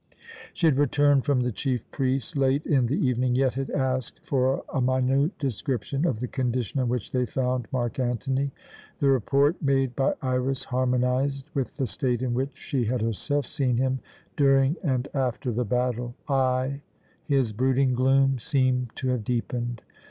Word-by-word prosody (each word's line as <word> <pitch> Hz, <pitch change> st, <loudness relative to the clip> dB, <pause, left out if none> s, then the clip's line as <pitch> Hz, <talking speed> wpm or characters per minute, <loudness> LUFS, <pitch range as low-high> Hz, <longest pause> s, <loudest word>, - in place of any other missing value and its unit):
She 175 Hz, -, -1 dB
had 145 Hz, -4 st, +4 dB
returned 145 Hz, -1 st, +3 dB
from 140 Hz, -3 st, +2 dB
the 125 Hz, 0 st, 0 dB
chief 125 Hz, +1 st, -2 dB
priest 130 Hz, -2 st, -1 dB
late 140 Hz, +1 st, +2 dB
in 130 Hz, -5 st, +2 dB
the 135 Hz, -, 0 dB
evening, 125 Hz, -2 st, +1 dB
yet 130 Hz, -1 st, +2 dB
had 135 Hz, +1 st, -3 dB
asked 130 Hz, -2 st, -1 dB
for 130 Hz, 0 st, +1 dB
a 135 Hz, -, +1 dB
minute 130 Hz, +5 st, +1 dB
description 135 Hz, +3 st, -2 dB
of 120 Hz, -9 st, -1 dB
the 125 Hz, -, -1 dB
condition 125 Hz, +1 st, -2 dB
in 125 Hz, -2 st, +1 dB
which 125 Hz, -3 st, -2 dB
they 125 Hz, -1 st, 0 dB
found 125 Hz, 0 st, -1 dB
Mark 120 Hz, -2 st, -2 dB
Antony. 130 Hz, +3 st, 0 dB, 0.5 s
The 140 Hz, -, +3 dB
report 140 Hz, -, +2 dB
made 135 Hz, -4 st, +1 dB
by 135 Hz, -, +1 dB
Iras 130 Hz, +1 st, 0 dB
harmonized 130 Hz, +3 st, 0 dB
with 135 Hz, -6 st, -2 dB
the 135 Hz, -, 0 dB
state 125 Hz, -1 st, -1 dB
in 125 Hz, -2 st, 0 dB
which 130 Hz, +2 st, -2 dB
she 130 Hz, -4 st, -2 dB
had 120 Hz, 0 st, -1 dB
herself 140 Hz, +6 st, -1 dB
seen 125 Hz, -3 st, 0 dB
him 130 Hz, +1 st, +1 dB, 0.4 s
during 135 Hz, 0 st, +4 dB
and 130 Hz, -5 st, 0 dB
after 130 Hz, -1 st, -1 dB
the 120 Hz, +2 st, -1 dB
battle. 120 Hz, +1 st, -1 dB
Ay, 130 Hz, 0 st, +1 dB, 0.5 s
his 135 Hz, -7 st, +1 dB
brooding 130 Hz, +3 st, +2 dB
gloom 135 Hz, +1 st, +3 dB
seemed 130 Hz, -4 st, 0 dB
to 130 Hz, -, -2 dB
have 125 Hz, -3 st, 0 dB
deepened. 120 Hz, 0 st, -2 dB
130 Hz, 165 wpm, -26 LUFS, 125-135 Hz, 0.5 s, had